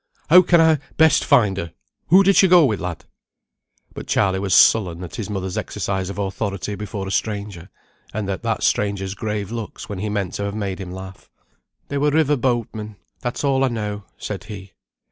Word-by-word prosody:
"How 180 - +10
can 175 -1 +4
I 160 -2 +4 0.2
best 160 0 +5
find 105 -9 +3
her? 85 -4 -5 0.3
Who 185 +4 +6
did 195 0 +4
she 190 - +6
go 175 -3 +6
with, 110 -6 0
lad?" 90 -2 -5 0.9
But - - -8
Charley 95 -1 +1
was 95 -1 +1
sullen 90 -6 +4
at 90 - -8
his 110 -2 -5
mother's 95 -2 -3
exercise 95 -1 -3
of 100 - -7
authority 100 0 -3
before 100 -1 -5
a - - -4
stranger, 100 -4 -3 0.4
and 105 -1 -4
at 95 -2 -3
that - - -2
stranger's 100 -2 0
grave 105 -1 -4
looks 115 -3 -7
when 100 -3 -5
he 105 +2 -3
meant 100 -4 -2
to 100 - -3
have 100 0 -4
made 100 -3 -3
him 90 -2 -7
laugh. 95 +1 -10 0.6
"They 140 - -2
were 150 +1 +3
river 150 -1 +2
boatmen; 115 -4 -2 0.2
that's 120 +3 -4
all 135 -1 +2
I - - +3
know," 105 -4 -4
said 100 -3 -6
he. 100 -3 -9
105 Hz, 195 wpm, -21 LUFS, 95-120 Hz, 0.9 s, How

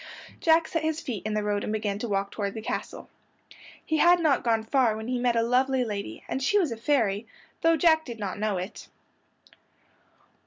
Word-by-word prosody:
Jack 325 0 +4
set 330 -3 -2
his 315 0 -1
feet 240 - -5
in 215 - -2
the 210 - 0
road 205 -1 -1
and - - -3
began 210 -2 -2
to 240 - -3
walk 200 -1 -1
toward 200 -1 -3
the 220 - -5
castle. - - -5 0.8
He 315 - 0
had 350 +3 +5
not 305 -6 +2
gone 225 -2 +1
far 230 -2 +2
when 220 +1 -6
he 250 0 -1
met 245 -1 +1
a 230 - +3
lovely 255 +2 +2
lady, 200 - -5
and 265 - -3
she 340 +10 +2
was 345 -10 +1
a - - -2
fairy, 225 -5 0 0.3
though 330 0 +4
Jack 320 0 +4
did 235 -2 -7
not 200 -3 -4
know 210 -2 0
it. 185 +3 -7
235 Hz, 205 wpm, -27 LUFS, 210-295 Hz, 0.8 s, had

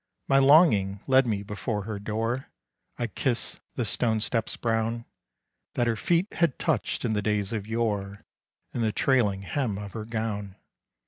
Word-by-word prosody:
My 135 - +5
longing 135 - +5
led 130 -1 +4
me 105 -3 -1
before 105 +1 -3
her 105 0 -5
door; 115 +5 -2 0.5
I 120 - -1
kissed 120 +3 -1 0.2
the 120 - -1
stone 110 +2 +1
steps 115 +1 -1
brown, 115 0 -1 0.7
That 120 - +2
her 115 -1 +1
feet 170 - +1
had 165 -6 +1
touched - - -1
in 110 - +1
the 105 - 0
days 105 0 -1
of 105 -2 -3
yore, 105 -3 -2 0.5
And 120 - -2
the 110 - +2
trailing 105 -6 +2
hem 115 -1 -1
of 100 -2 -7
her 110 -1 -5
gown. 110 -3 -3
110 Hz, 165 wpm, -27 LUFS, 105-120 Hz, 0.7 s, My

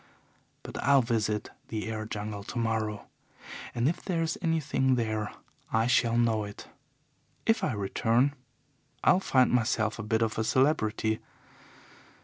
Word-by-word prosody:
But - - -6
I'll 140 -2 +5
visit 110 -3 -1 0.2
the 110 -1 -4
air 110 -1 -4
jungle 105 -1 -5
tomorrow 110 -2 -2 0.7
and 120 +2 +2
if 170 +3 -1
there's 165 -4 -1
anything 145 -5 +1
there 110 -3 -1 0.4
I 110 0 +2
shall 120 -1 +3
know 115 -2 +2
it. 105 0 -9 0.8
If 225 -2 +2
I 185 - +1
return, 115 +6 +1 0.7
I'll 185 - +5
find 130 -9 +3
myself 110 -2 +1
a - - -1
bit 110 +2 +1
of 110 0 -1
a - - +2
celebrity. 110 -4 +1
115 Hz, 130 wpm, -29 LUFS, 110-130 Hz, 0.8 s, I'll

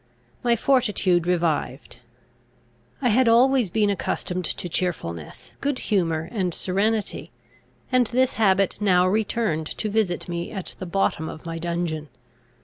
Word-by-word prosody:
My 240 -1 +3
fortitude 210 -9 +2
revived. 165 -6 -1 1.1
I 245 - +4
had 245 +3 +4
always 245 -1 +4
been 210 +2 +2
accustomed 185 -2 -2
to 175 - -3
cheerfulness, 150 - -3
good 280 -2 0
humour, 165 -8 0
and 185 -6 -1
serenity; 205 +3 -1 0.6
and 250 -2 +3
this 255 +3 +1
habit 195 -2 +2
now 180 -3 +4
returned 200 -5 0
to 215 - -2
visit 205 -5 0
me 170 0 -4
at 190 -4 -6
the 185 - -5
bottom 170 -3 0
of 155 - -10
my 165 0 -4
dungeon. 170 -3 -3
190 Hz, 135 wpm, -24 LUFS, 170-225 Hz, 1.1 s, I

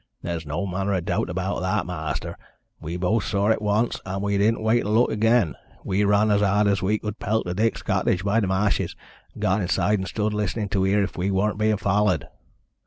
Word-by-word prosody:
"There's 85 -2 -4
no 80 +7 -2
manner 95 +1 -1
o' - - +1
doubt 85 - -2
about - - -2
that, - - 0
ma'aster. - - -4 0.4
We 85 +3 -5
both 100 +5 +1
saw 100 +1 0
it 110 - 0
once, 105 +3 0
and 95 +1 -4
we 100 0 0
didn't 110 +2 +2
wait 115 +2 +3
to - - -4
look 115 +3 +3
again. 115 -3 +2 0.3
We 95 +2 0
run 105 +1 +3
as 100 0 +3
hard 105 +1 +3
as 100 -1 +2
we 105 +3 +1
could 105 0 -6
pelt 110 +2 0
to 90 - -2
Dick's 110 +4 0
cottage 90 - 0
by 100 +3 +2
the 100 - 0
ma'shes, 95 +2 0 0.4
and - - -8
got 95 +3 +2
inside 100 +3 +1
and 95 - -4
stood 105 0 -1
listenin' 105 0 -2
to 95 -2 +1
heer 100 +1 +2
if 95 - -5
we 95 +3 0
were 100 +2 +1
bein' 110 0 +1
follered. 100 - +1
100 Hz, 220 wpm, -24 LUFS, 95-105 Hz, 0.4 s, wait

